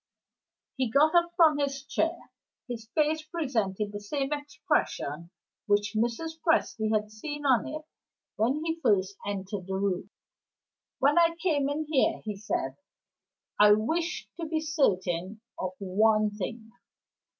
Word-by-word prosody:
He 260 -3 +1
got 295 +7 +4
up 345 0 +4
from 320 -4 +5
his 275 -1 -1
chair. 330 +4 -2 0.4
His 230 -3 -6
face 310 0 +2
presented 230 - -2
the 205 - -5
same 270 +7 -2
expression 170 - -2 0.4
which 205 +1 +2
Mrs. 240 +9 -1
Presty 225 -9 +2
had 210 -1 0
seen 290 +7 -6
on 255 -4 +3
it 310 +1 -5 0.5
when 270 +8 0
he 325 0 -1
first 200 -8 +2
entered 195 -1 -4
the 190 - -2
room. 190 -1 -1 0.9
"When 285 +5 +4
I 335 0 +4
came 295 -6 +1
in 305 +2 -2
here," 295 -4 +2
he 210 -1 -3
said, 205 +3 -3 0.8
"I 210 0 +8
wished 320 +11 -1
to 330 - -3
be 315 0 0
certain 205 - 0 0.2
of 185 0 -2
one 215 +2 +2
thing. 220 +2 -6
240 Hz, 140 wpm, -28 LUFS, 205-310 Hz, 0.9 s, I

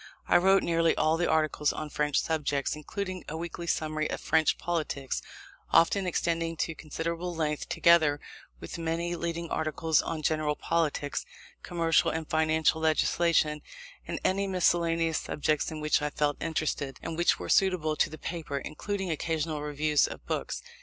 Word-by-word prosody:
I - - +6
wrote 190 +2 +4
nearly 165 -1 +2
all 155 +1 +3
the 175 +1 0
articles 155 -1 +2
on 155 -1 -6
French 150 -1 +1
subjects, 145 -3 -1
including 185 +4 -5
a 160 - -4
weekly 170 +1 -6
summary 155 -1 -1
of - - -3
French 160 0 +2
politics, 155 -6 -2 0.5
often 185 +3 +4
extending 165 -1 -1
to 165 - -1
considerable 170 +3 -4
length; 150 -2 -2
together 160 -4 +4 0.4
with - - -7
many 170 +1 -1
leading 170 0 -4
articles 160 0 +1
on 160 -2 -4
general 155 -1 +1
politics, 155 -4 -1 0.4
commercial 165 -2 +2
and 160 -1 -3
financial 160 0 +2
legislation, 160 -1 +2 0.5
and - - -3
any 195 +1 +1
miscellaneous 170 -3 +2
subjects 150 0 -1
in 155 -2 -6
which 150 0 +2
I 150 - 0
felt 145 0 -1
interested, 155 -4 -2
and 165 - -4
which 175 +1 +3
were - - -6
suitable 180 -5 +2
to - - +2
the 155 - -9
paper, 160 -3 -4
including 190 +6 -4
occasional 160 -1 -2
reviews 150 0 +2
of - - -9
books. - - -3
160 Hz, 155 wpm, -29 LUFS, 150-170 Hz, 0.5 s, I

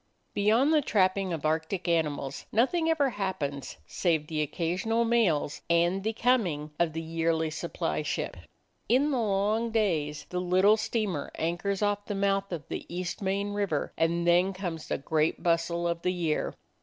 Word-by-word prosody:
Beyond 225 +9 +3
the 305 - +5
trapping 190 -5 +1
of 160 -3 -3
Arctic 160 +4 -1
animals 150 -5 -1
nothing 320 +9 +2
ever 290 -5 +2
happens 150 - -3
save 160 - 0
the 155 0 -2
occasional 185 +10 0
mails 205 -12 +1
and 175 +3 +2
the 220 - 0
coming 200 -12 +1
of 170 -2 +2
the 165 +1 -4
yearly 160 -1 0
supply 160 - -2
ship. - - -3 0.5
In 275 +5 +3
the 260 - +1
long 210 +2 +1
days 165 -10 0
the 180 0 -1
little 185 +4 +4
steamer 215 -8 -2
anchors 180 +5 -1
off 205 0 0
the 205 - -3
mouth 195 0 0
of 165 -4 -4
East 180 +2 -4
Main 200 +1 -1
River, 200 -8 -1
and 170 +1 +1
then 175 +3 +4
comes 175 -4 -5
the - - -1
great 155 +3 0
bustle 170 0 +1
of 170 0 -2
the 180 - +1
year. 165 -4 -1
180 Hz, 160 wpm, -28 LUFS, 165-205 Hz, 0.5 s, the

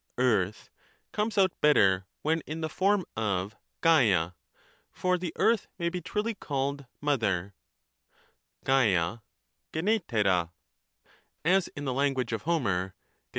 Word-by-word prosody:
(earth) 105 -6 +1 0.4
comes 210 0 -1
out 190 -2 +5
better 95 -10 +4 0.2
when 160 +2 +1
in 155 +2 -5
the 160 - -2
form 195 +2 +1
of 100 -2 -1 0.3
yam, 105 - +4 0.6
for 180 0 0
the 180 -2 -3
earth 225 -3 +2
may 170 -1 0
be 180 +1 -4
truly 210 +6 -2
called 140 - -3
' - - -48
mother 105 -10 0 0.5
' - - -38
{yala, 110 -7 +2 0.5
yEvvqrecpa), 115 - +1 1.0
as 185 +1 +3
in 145 - -5
the 130 - -1
language 130 -3 0
of 110 - -2
Homer 100 - 0
(Od. - - -45
140 Hz, 130 wpm, -28 LUFS, -, 1.0 s, out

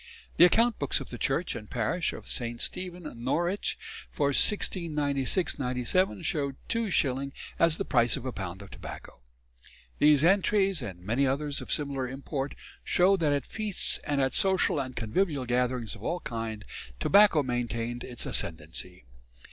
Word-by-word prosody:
The 175 - +9
account 230 +5 +3
books 140 - +1
of - - -8
the 120 - -6
church 160 +6 0
and 105 -2 -8
parish 160 +10 0
of - - -9
St. 120 -1 -3
Stephen, 180 -1 -4 0.2
Norwich, 175 +9 0 0.3
for 140 -1 +1
1696 150 - +1
97 130 +9 0
show 140 -4 0 0.2
2s. 140 - 0 0.3
as 165 -1 +4
the 195 - -2
price 120 -1 +3
of 130 - -7
a 130 - -2
pound 95 -1 -6
of 100 - -13
tobacco. - - -9 0.8
These 150 -1 +6
entries, 195 +1 +3
and 90 -4 -6
many 120 +9 +1
others 140 +2 -1
of - - -7
similar 140 -3 -1
import, 135 +1 -4 0.3
show 185 +2 +4
that 160 -5 +2
at 140 -3 0
feasts 215 -3 -1
and 145 -2 0
at 135 -1 +1
social 190 -5 +2
and 130 -2 -4
convivial 135 - 0
gatherings 125 -2 0
of 105 - -11
all 175 +10 -2
kinds, 115 -3 -5 0.3
tobacco 195 - +5
maintained 120 -1 -2
its 125 -2 -5
ascendancy. 80 -1 -4
140 Hz, 155 wpm, -29 LUFS, 120-175 Hz, 0.8 s, The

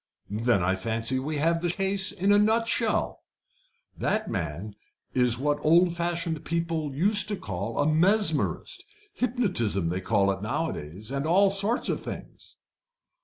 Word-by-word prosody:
Then 110 -2 +1
I 95 +2 +1
fancy 115 +6 -1
we 150 +3 -3
have 165 +3 +1
the 175 - 0
case 195 +2 0
in 195 +1 0
a 205 - +6
nutshell. 225 +2 +1 0.7
The 215 +1 0
man 90 +4 -4 0.4
is 125 -2 +3
what 145 +2 -1
old 170 +2 +4
fashioned 170 -2 -2
people 165 -4 -2
used 200 +6 +3
to 205 - -1
call 100 - -5
a 145 - +2
mesmerist 195 - +1 0.3
hypnotism 180 - 0
they 90 +2 -2
call 100 -1 +2
it 95 0 -5
nowadays, 105 - -4
and 140 +2 -2
all 195 +4 +4
sorts 200 +5 +1
of - - -1
things." - - -10
155 Hz, 145 wpm, -26 LUFS, -, 0.7 s, a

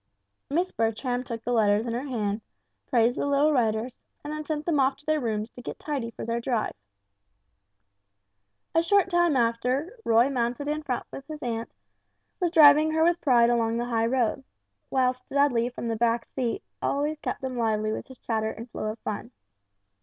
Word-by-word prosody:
Miss 345 +6 0
Bertram 235 +3 -1
took 230 -2 -6
the 245 - -1
letters 215 -1 +3
in 235 - -2
her 250 +4 -3
hand, 215 -4 -2 0.5
praised 240 0 +2
the - - 0
little 285 +2 +3
writers, 230 -1 0 0.2
and 295 +1 -5
then 305 0 -4
sent 300 0 -3
them 320 -4 +1
off 265 0 +2
to 290 - -22
their 310 0 +2
rooms 220 -3 -2
to 245 - -11
get - - -6
tidy 275 -6 -3
for - - -7
their 230 +1 -1
drive. 235 -3 -1 2.0
A 330 - +4
short 380 +2 +3
time 345 -5 +3
after, 250 - 0
Roy 230 +2 +4
mounted 250 +1 -1
in 300 +1 -1
front 260 -5 -3
with 275 - -9
his 310 -1 -7
aunt, 230 -1 -4 0.6
was 355 -2 +1
driving 305 -1 +7
her 320 0 +3
with 345 +1 +2
pride 240 -4 +4
along 230 -1 +1
the 240 - -1
high 230 -2 +1
road; 250 +1 0 0.5
whilst 255 -1 0
Dudley 270 -4 +2
from 240 -1 -6
the 225 - -1
back 230 0 +1
seat 240 -3 -3 0.6
kept - - -3
them 260 -1 -4
lively 215 -2 0
with - - -5
his 260 -2 -13
chatter 220 -2 -1
and 230 +2 -8
flow - - -4
of - - -15
fun. 215 +2 -4
245 Hz, 185 wpm, -27 LUFS, 230-290 Hz, 2.0 s, driving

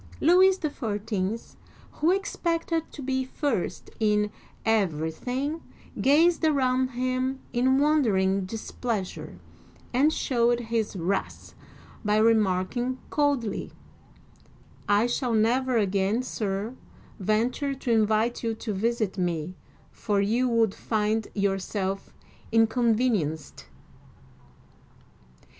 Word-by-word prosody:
Louis 370 +4 +5
XIV., 220 - -3 0.4
who 315 - 0
expected 335 -4 -1
to 285 - -8
be 260 0 0
first 260 - -3
in 210 -1 +2 0.3
everything, 225 - -1 0.4
gazed 325 +5 +4
around 260 -4 +2
him 255 +1 -2
in 260 +2 +3
wondering 205 -11 +2
displeasure, 220 -1 -4 0.6
and 280 +5 +4
sho\ved 240 -5 +1
his 225 -3 -1
wrath 190 +2 -3 0.5
by 210 -1 +2
remarking 220 +3 +2
coldly, 285 -7 0 0.6
" - - -24
I 225 - +2
shall 245 0 -1
never 245 +3 +2
again, 200 +3 +1
sir, 210 -2 -3 0.5
venture 235 +8 0
to 260 -2 -3
invite 220 +1 +2
you 225 -1 -1
to 220 -1 -4
visit 215 -1 -1
me, 175 -1 -2 0.4
for 205 -2 -1
you 230 +6 +1
would 225 -4 +2
find 215 0 -1
yourself 195 -1 -2 0.4
inconvenienced!. 225 - +1
230 Hz, 95 wpm, -26 LUFS, 205-260 Hz, 0.6 s, Louis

